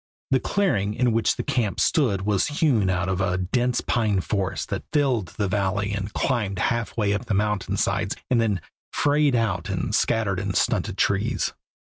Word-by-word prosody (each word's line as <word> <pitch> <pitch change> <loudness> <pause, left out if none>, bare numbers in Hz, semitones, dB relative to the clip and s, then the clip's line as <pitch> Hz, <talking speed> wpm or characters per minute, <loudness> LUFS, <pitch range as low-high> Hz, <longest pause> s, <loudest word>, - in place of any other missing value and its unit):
The 130 - +4
clearing 105 - 0
in 125 -1 +2
which 115 0 +2
the - - -3
camp 110 -6 -1
stood 110 -11 +2
was 100 -2 +1
hewn 145 - +2
out 90 -1 0
of 95 0 -1
a 90 -1 0
dense 120 +7 0
pine 110 -5 +1
forest 95 0 -2
that - - -3
filled 130 - +1
the 105 - 0
valley 100 +1 0
and 100 0 -3
climbed 105 -7 -1
halfway 115 -1 0
up 105 +4 -3
the 105 - -1
mountain 105 -1 0
sides - - 0
and 120 -2 +2
then 105 -6 0 0.3
frayed 145 -2 +2
out 100 -7 0
in - - -2
scattered 105 -5 +1
and 100 -1 -3
stunted - - 0
trees. - - 0
105 Hz, 175 wpm, -24 LUFS, 95-120 Hz, 0.3 s, The